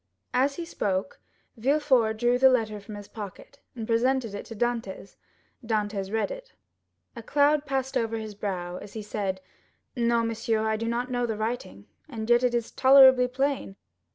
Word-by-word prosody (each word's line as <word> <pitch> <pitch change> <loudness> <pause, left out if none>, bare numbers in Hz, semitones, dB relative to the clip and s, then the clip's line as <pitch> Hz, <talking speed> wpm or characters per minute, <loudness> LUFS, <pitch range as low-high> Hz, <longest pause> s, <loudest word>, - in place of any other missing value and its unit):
As 270 +3 +2
he 340 - -5
spoke, 200 - -2 0.4
Villefort 255 -3 +2
drew 240 +2 +2
the 265 0 +7
letter 220 -4 0
from 205 +1 -10
his 205 -1 -9
pocket, 210 +6 -10 0.2
and 225 -2 -5
presented 235 0 +1
it 205 - -6
to 225 - -8
Dantès. 225 -4 -3 0.5
Dantès 205 -3 -2
read 220 - 0
it. - - -9 0.6
A 230 - -7
cloud 290 +4 +2
passed 265 -1 -2
over 225 0 0
his 220 -1 -6
brow 180 -3 -4
as 205 +1 -10
he 220 - -6
said: 195 -2 -3 0.5
"No, 235 -1 +2
monsieur, 225 -1 -1
I 220 0 +1
do 230 +1 -3
not 240 +2 -2
know 245 -1 0
the 220 -2 -3
writing, 215 - -4 0.2
and 220 -5 -5
yet 240 0 +5
it 245 -1 +2
is 235 -1 -2
tolerably 260 -1 +7
plain. 265 -5 -2
230 Hz, 175 wpm, -27 LUFS, 215-260 Hz, 0.6 s, the